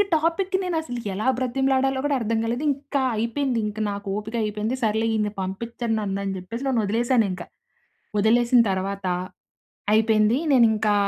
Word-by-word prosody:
Topic 340 +4 0
నేను 360 -2 -2
అసలు 245 -6 -5
ఎలా 210 +6 -2
బ్రతిమలాడాలో 265 +1 +1
కూడా 290 - +2
అర్థం 225 0 0
కాలేదు 235 +5 -2
ఇంక 280 +1 -7 0.2
అయిపోయింది 235 +2 0
ఇంక 210 0 -6
నాకు 200 0 -6
ఓపిక 215 +2 -5
అయిపోయింది 215 +3 -2
సర్లే 220 +1 +1
ఈన్ని 210 -1 0
పంపించరు 230 +5 -3
నన్ను 200 -2 -2
అనే 195 -1 -2
చెప్పేసి 230 +8 -6
నన్ను 250 -4 +2
వదిలేసాను 230 +3 +2
ఇంకా. 180 -1 -6 0.7
వదిలేసిన 240 +3 +4
తరువాత 195 +1 -3 0.9
అయిపోయింది. 220 +1 +4 0.2
నేను 245 -3 +6
ఇంకా 210 -1 +1
230 Hz, 150 wpm, -24 LUFS, 210-260 Hz, 0.9 s, నేను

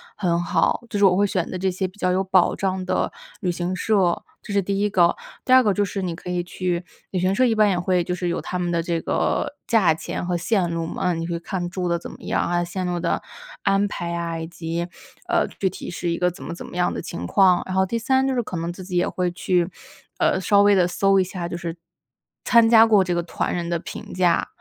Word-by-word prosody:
很 175 -3 0
好， 175 - +1
就 210 - -2
是 205 - +2
我 185 -1 +5
会 205 +1 +3
选 185 -3 -1
择 185 - -4
这 190 +1 0
些 185 +1 -2
比 185 +2 -16
较 185 - +1
有 190 +1 +1
保 185 -1 +3
障 190 -1 -2
的 - - 0 0.3
旅 180 -3 0
行 175 +1 -2
社， 185 -3 +1 0.2
这 210 - -7
是 200 - +3
第 195 +1 -2
1 210 +1 +2
个。 175 -3 +3 0.3
第 - - -2
2 260 0 +8
个 210 -5 +2
就 205 - +1
是 195 0 -3
你 175 -3 -3
可 180 - -9
以 180 0 0
去 180 0 -2 0.3
旅 185 - -1
行 185 +2 +2
社 255 - +4
一 235 - +3
般 215 -1 +4
也 185 - +1
会 180 0 +1
就 180 - -2
是 180 -1 -2
有 170 - -1
他 180 - -4
们 175 -1 -1
的 170 -1 +1
这 165 0 -2
个 - - 0
价 200 -8 +4
钱 165 - -5
和 175 0 0
线 180 0 +1
路 165 0 -2
嘛， - - -5
那 180 - +2
你 165 0 -3
可 170 - -3
以 - - -1
去 - - -7
看 180 -3 -3
住 180 -1 -2
得 170 0 +1
怎 - - -8
么 - - -13
样 - - 0
啊， 175 0 0
线 180 +2 -4
路 175 -1 -1
的 170 - 0 0.4
安 195 +1 +3
排 170 -3 -4
啊， 170 -1 -3
以 160 - -5
及， 170 0 -4 0.4
呃， 345 -1 +2
具 190 - +2
体 185 - -8
是 175 0 -3
一 170 - -1
个 180 0 +1
怎 175 - -14
么 - - -5
怎 - - -8
么 - - -9
样 180 0 +1
的 - - -4
情 85 +1 -6
况。 185 - +4
然 185 - -4
后 190 0 +3
第 230 +5 -2
3 265 +3 +2
就 270 - +1
是 250 - +1
可 200 - -6
能 165 +1 -2
自 185 +2 -9
己 180 0 -6
也 175 - +2
会 180 -1 -1
去， 175 0 0 0.5
呃， - - +2
稍 200 +1 +4
微 205 0 +5
地 180 -2 +4
搜 195 +2 +3
一 - - +4
下， 180 -1 -5
就 170 - -5
是， 170 -1 -5 0.7
参 235 -2 +5
加 225 -1 +8
过 210 -3 +5
这 180 -1 -1
个 175 - 0
团 - - -2
人 170 -1 -3
的 170 - +1
评 - - -8
价。 180 -2 +2
180 Hz, 285 characters per minute, -23 LUFS, 175-195 Hz, 0.7 s, 2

